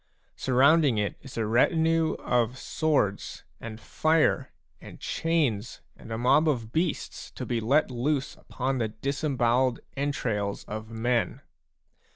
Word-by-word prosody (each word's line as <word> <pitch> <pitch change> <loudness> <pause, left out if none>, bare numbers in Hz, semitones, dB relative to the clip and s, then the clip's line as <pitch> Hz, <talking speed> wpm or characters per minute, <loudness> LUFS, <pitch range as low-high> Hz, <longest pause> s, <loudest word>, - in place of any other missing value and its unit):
Sur 130 - -2
rounding 140 -1 +5
it 105 -3 -1
is 135 -3 -11
a 115 - 0
retinue 160 +7 +2
of 125 0 0
swords 140 - -1 0.2
and 110 -1 -8
fire 155 +6 +1 0.3
and - - -11
chains 140 -10 -1
and 115 - -12
a 110 - -2
mob 135 +7 +4
of 115 -6 -2
beasts 165 +3 -2
to - - -7
be 120 -2 -1
let 135 +5 +2
loose 135 +3 -1
upon 130 +1 -3
the 115 - +1
dis 135 +8 -4
embowelled 125 -3 +2 0.2
entrails 120 -8 -2
of 110 +1 -7
men. 115 +1 -1
125 Hz, 140 wpm, -27 LUFS, 115-150 Hz, 0.3 s, rounding